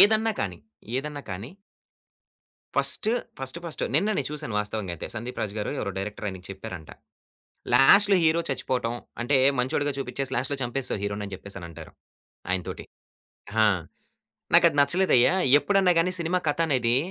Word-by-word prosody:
ఏదన్నా 220 +1 +5
కానీ, 90 -3 -3 0.4
ఏదన్నా 145 +1 -4
కాని 100 +8 -6 1.3
ఫస్ట్ 215 - +2 0.3
ఫస్ట్ 135 +5 -5
ఫస్ట్ 165 - -5
నిన్న 205 - +3
నేను 140 - -2
చూసాను 150 -7 -4
వాస్తవంగా 105 -3 -4
అయితే. 85 - -6
సందీప్ 120 +2 -6
రాజు 105 -1 -3
గారు 105 - -2
ఎవరో 100 - -2
డైరెక్టర్ 105 +1 -5
ఆయనకి 95 -1 -8
చెప్పారంట. 90 -4 -8 0.8
"లాస్ట్‌లో 195 +10 +7
హీరో 160 +1 +3
చచ్చిపోవటం 125 -3 -2 0.3
అంటే 135 +3 +2 0.2
మంచోడిగా 145 +3 0
చూపిచ్చేసి, 135 0 -4
లాస్ట్‌లో 130 +3 -1
చంపేసావు 120 -3 -2
హీరో‌ని" 100 0 -3
అని 100 - -10
జెప్పేసి 100 +1 -7
అనంటారు 85 -2 -10 0.6
ఆయన 95 -1 0
తోటి. - - -6 0.8
ఆ! - - +5 0.9
"నాకది 145 - +6
నచ్చలేదయ్యా! 175 -2 +3 0.3
ఎప్పుడన్నా 195 -3 +3
గాని, 180 +2 0
సినిమా 175 +2 0
కథ 150 - 0
అనేది 125 -3 +2
130 Hz, 145 wpm, -26 LUFS, 105-155 Hz, 1.3 s, లాస్ట్‌లో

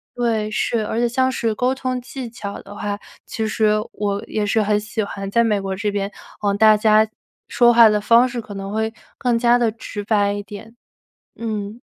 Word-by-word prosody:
对， 225 -3 0
是， 220 0 0
而 225 - -3
且 240 - +2
像 260 +2 +1
是 230 -3 -1
沟 250 +3 +1
通 255 -1 -3
技 255 0 -7
巧 205 -3 -7
的 200 +1 -11
话， 205 0 -3 0.3
其 220 -1 -3
实 215 -1 +2 0.2
我 200 -1 -2
也 215 - -2
是 215 +2 +2
很 210 0 +2
喜 210 +1 -3
欢 195 -1 -5
在 235 +3 +3
美 210 -3 +1
国 195 0 -3
这 205 +2 -2
边 200 0 -2 0.3
呃， 205 -1 +1
大 215 +1 +6
家 215 0 +4 0.4
说 240 -1 +4
话 230 -1 +8
的 210 0 +2
方 235 +4 +5
式 245 -1 -4
可 210 - -10
能 195 0 -5
会 220 0 -1 0.3
更 245 -3 +1
加 240 0 +4
地 230 -2 +2
直 210 -2 -7
白 205 -1 +2
一 205 - -4
点， 210 +3 -11 0.6
嗯。 215 -1 -5
215 Hz, 220 characters per minute, -21 LUFS, 205-235 Hz, 0.6 s, 话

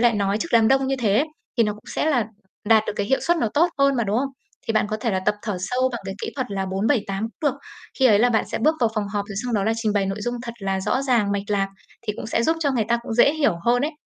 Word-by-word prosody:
lại 240 -1 +5
nói 200 0 0
trước 335 - -3
đám 225 -1 +5
đông 270 0 +3
như 270 0 0
thế, 220 +4 +3 0.3
thì 230 - +6
nó 210 - 0
cũng 210 +1 -15
sẽ - - 0
là 245 -8 +1 0.4
đạt 220 -1 +6
được - - -1
cái 205 - -1
hiệu 265 - +1
suất 345 - +2
nó 235 -9 0
tốt 335 +4 +4
hơn 275 -1 +3
mà, 235 - +1
đúng 205 +2 0
không? 270 +2 -1 0.4
Thì 225 - 0
bạn 215 - +2
có 215 - 0
thể 230 - 0
là 190 -2 0
tập 210 - +3
thở 210 -4 -3
sâu 250 +7 0
bằng 235 - -4
cái 195 - -5
kỹ - - -3
thuật 260 -4 -3
là 195 -1 -2
4-7-8 195 +1 0 0.2
cũng 295 - +2
được. 275 - -9 0.4
Khi 260 - +5
ấy 210 -4 +5
là 245 +3 +4
bạn 220 - +2
sẽ - - -1
bước 310 +8 +3
vào 230 -2 +3
phòng 210 -2 -1
họp 200 0 -2
rồi 200 - -7
xong 245 -2 -2
đó 200 - +1
là 220 - +2
trình 220 -2 0
bày 200 -2 +1
nội 195 +1 -3
dung 240 +3 -2
thật 235 - -5
là 195 -2 -2
rõ 210 +7 0
ràng, 235 -7 +2
mạch 200 -1 -1
lạc 195 -1 +1 0.4
thì 210 - 0
cũng - - -6
sẽ 230 0 0
giúp 325 +5 +2
cho 285 -3 +2
người 235 -5 +1
ta 235 0 +2
cũng 230 - -4
dễ 245 +5 +5
hiểu 290 - +1
hơn 245 +2 +3
ấy. 305 +3 -1
225 Hz, 315 wpm, -23 LUFS, 205-260 Hz, 0.4 s, thì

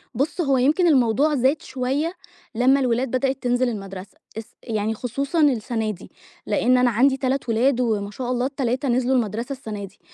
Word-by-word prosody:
بُصّ، 290 +7 -1
هو 275 -4 +2
يمكن 305 +8 +3
الموضوع 275 +1 +3
زاد 265 +4 +1
شوية 270 +6 -2 0.4
لمّا 260 +4 +4
الولاد 250 0 0
بدأت 265 +1 -1
تنزل 245 0 +1
المدرسة، 195 -3 -8 0.2
إس 225 +1 -8
يعني 220 -1 -2
خصوصًا 275 +8 -2
السنة 225 -5 +1
دي، 185 -2 -12 0.4
لأن 255 +1 +2
أنا 250 0 +4
عندي 265 +4 +3
3 260 -1 -2
ولاد 250 +3 +2
وما 210 -4 -1
شاء 250 +3 -4
الله 250 0 0
ال3 270 0 -2
نزلوا 255 +2 +2
المدرسة 230 +3 -1
السنة 215 -6 -6
دي، 195 - -17
250 Hz, 170 wpm, -22 LUFS, 225-270 Hz, 0.4 s, لمّا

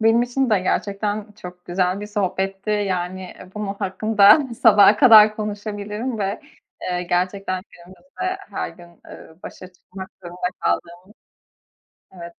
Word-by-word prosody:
Benim 225 +2 +4
için 245 +1 -1
de 210 - +4
gerçekten 205 +3 -2
çok 180 -3 -12
güzel 180 +2 -1
bir 210 - -6
sohbetti. 195 0 -3
Yani 185 -3 -3 0.2
bunun 210 -2 -4
hakkında 200 +2 +4 0.2
sabaha 210 -2 +7
kadar 215 -3 +7
konuşabilirim 210 +2 -5
ve, 200 +1 -3 0.4
eee, 180 -1 -2
gerçekten 185 +1 -2
günümüzde 275 - -7
her - - -4
gün, 170 -1 -17
eee, 160 - -13
başa 185 0 -11
çıkmak 190 +1 -11
zorunda 180 +1 -4
kaldığımız 170 - -2 1.1
Evet 170 -2 -11
195 Hz, 125 wpm, -21 LUFS, 180-210 Hz, 1.1 s, sabaha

